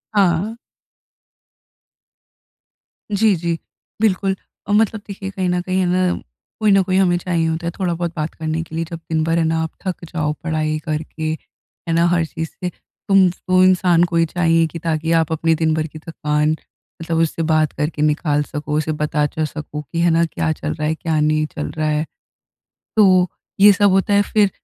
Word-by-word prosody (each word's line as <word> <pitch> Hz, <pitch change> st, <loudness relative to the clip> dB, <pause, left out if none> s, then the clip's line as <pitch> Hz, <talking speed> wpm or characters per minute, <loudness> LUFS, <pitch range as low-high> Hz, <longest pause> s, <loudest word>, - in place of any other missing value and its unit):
हाँ। 195 Hz, +2 st, +2 dB, 2.6 s
जी, 205 Hz, 0 st, +3 dB
जी। 170 Hz, 0 st, -2 dB, 0.4 s
बिल्कुल, 195 Hz, -2 st, +2 dB, 0.3 s
अ, -, -, -2 dB
मतलब 215 Hz, 0 st, +2 dB
देखिए 195 Hz, -1 st, -6 dB
कहीं 190 Hz, -1 st, -2 dB
न 180 Hz, 0 st, +1 dB
कहीं 185 Hz, +1 st, -1 dB
है 185 Hz, -, +2 dB
ना, 180 Hz, 0 st, +1 dB, 0.4 s
कोई 215 Hz, -2 st, +3 dB
न 195 Hz, 0 st, +6 dB
कोई 185 Hz, 0 st, 0 dB
हमें 180 Hz, -2 st, +3 dB
चाहिए 170 Hz, -2 st, 0 dB
होता 160 Hz, +1 st, -2 dB
है -, -, -1 dB
थोड़ा 180 Hz, -3 st, 0 dB
बहुत 170 Hz, 0 st, -2 dB
बात 155 Hz, -1 st, -3 dB
करने 160 Hz, 0 st, -3 dB
के 160 Hz, -, -10 dB
लिए। 165 Hz, +1 st, -1 dB
जब 170 Hz, -2 st, -6 dB
दिन 160 Hz, -1 st, +1 dB
भर 165 Hz, +1 st, +1 dB
है 170 Hz, -, +2 dB
ना 160 Hz, 0 st, +1 dB
आप 160 Hz, -, -3 dB, 0.2 s
थक 185 Hz, -2 st, -3 dB
जाओ 150 Hz, -3 st, 0 dB
पढ़ाई 155 Hz, -1 st, -1 dB
करके, 155 Hz, 0 st, -3 dB, 0.6 s
है -, -, +1 dB
ना 170 Hz, +1 st, +3 dB
हर 170 Hz, -1 st, +2 dB
चीज़ 160 Hz, 0 st, -5 dB
से 180 Hz, -, -1 dB, 0.4 s
तुम 195 Hz, -1 st, +6 dB, 0.2 s
वो 185 Hz, 0 st, +5 dB
इंसान 180 Hz, -2 st, +4 dB
को 170 Hz, -, -3 dB
ही 165 Hz, 0 st, +4 dB
चाहिए 165 Hz, 0 st, +2 dB
कि 170 Hz, -, -6 dB
ताकि 160 Hz, 0 st, -1 dB
आप 160 Hz, -1 st, -1 dB
अपने 160 Hz, +1 st, +2 dB
दिन 160 Hz, -1 st, +3 dB
भर 155 Hz, 0 st, -1 dB
की 155 Hz, 0 st, -11 dB
थकान 150 Hz, -1 st, 0 dB, 0.5 s
मतलब 165 Hz, 0 st, -2 dB
उससे 165 Hz, 0 st, 0 dB
बात 155 Hz, -1 st, +3 dB
करके 150 Hz, +1 st, -2 dB
निकाल 150 Hz, -1 st, +2 dB
सको, 150 Hz, 0 st, -3 dB
उसे 155 Hz, 0 st, -1 dB
बता 150 Hz, -1 st, 0 dB
च 155 Hz, +2 st, -2 dB
सको 150 Hz, 0 st, -6 dB
कि 150 Hz, +4 st, -5 dB
है 170 Hz, -, +4 dB
ना 165 Hz, +1 st, +3 dB
क्या 160 Hz, -1 st, -1 dB
चल 155 Hz, 0 st, -4 dB
रहा 155 Hz, -1 st, -2 dB
है, 160 Hz, -, 0 dB
क्या 160 Hz, -1 st, -1 dB
नहीं 155 Hz, 0 st, +2 dB
चल 150 Hz, -, -3 dB
रहा 155 Hz, -1 st, 0 dB
है। 150 Hz, +1 st, 0 dB, 0.9 s
तो 185 Hz, -4 st, +5 dB, 0.3 s
ये 205 Hz, +1 st, +9 dB
सब 205 Hz, +1 st, +3 dB
होता 195 Hz, +2 st, +2 dB
है 200 Hz, -, +5 dB
फिर 210 Hz, -2 st, +3 dB
165 Hz, 200 wpm, -20 LUFS, 155-185 Hz, 2.6 s, ये